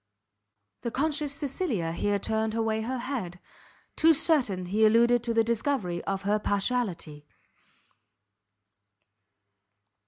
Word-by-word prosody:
The 235 - -2
conscious 295 +3 -1
Cecilia 270 - -2
here 205 +4 0
turned 220 +2 -1
away 220 -1 0
her 255 +4 -3
head; 235 -9 -5 0.6
too 325 0 +5
certain 250 - +1
he 205 +5 0
alluded 235 +2 +4
to 235 - -2
the 225 0 +3
discovery 225 -6 -1
of 195 0 -3
her 205 +2 +1
partiality. 195 -9 -2
225 Hz, 105 wpm, -27 LUFS, 195-255 Hz, 0.6 s, too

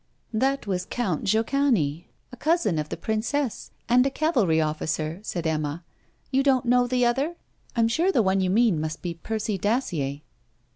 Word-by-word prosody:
'That 270 +4 +1
was 185 -2 -2
Count 195 -11 -1
Jochany, 220 - +1 0.3
a - - -8
cousin 300 - +1
of 150 0 -4
the - - -4
princess, 225 +4 -2 0.2
and 245 +2 +5
a 275 - +1
cavalry 250 - +2
officer,' 155 +1 -2
said 175 -5 -4
Emma. 155 +1 -1 0.5
'You 265 0 +3
don't 265 -2 +2
know 245 0 +3
the 250 0 +2
other? 275 +8 0 0.4
I 235 - +2
am 225 - +4
sure 335 +11 +2
the 240 - +3
one 190 0 +2
you 185 - +1
mean 205 -5 +3
must 155 +1 -4
be 175 -2 -2
Percy 215 +4 -3
Dacier.' 170 - -1
220 Hz, 175 wpm, -25 LUFS, 165-255 Hz, 0.5 s, and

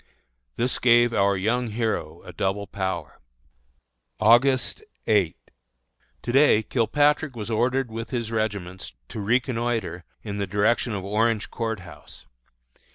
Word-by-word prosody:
This 125 +2 -1
gave 120 -1 +5
our 100 -1 +2
young 120 +6 0
hero 110 -8 -3
a 90 - -10
double 95 +4 -1
power. 95 -6 -4 1.0
August 125 - +4 0.2
8. 100 -7 +2 0.9
To 120 - -2
day 135 -5 +5
Kilpatrick 145 +4 +1
was 115 0 -5
ordered 125 +2 0
with 115 +1 -5
his 120 -3 -3
regiments 100 -5 -3 0.2
to - - -6
reconnoitre 115 -5 -1 0.2
in 100 -2 -5
the 100 - -1
direction 105 +4 +1
of 95 -2 -4
Orange 110 +2 0
Court 110 -4 -3
House. 90 - -13
110 Hz, 125 wpm, -25 LUFS, 100-120 Hz, 1.0 s, gave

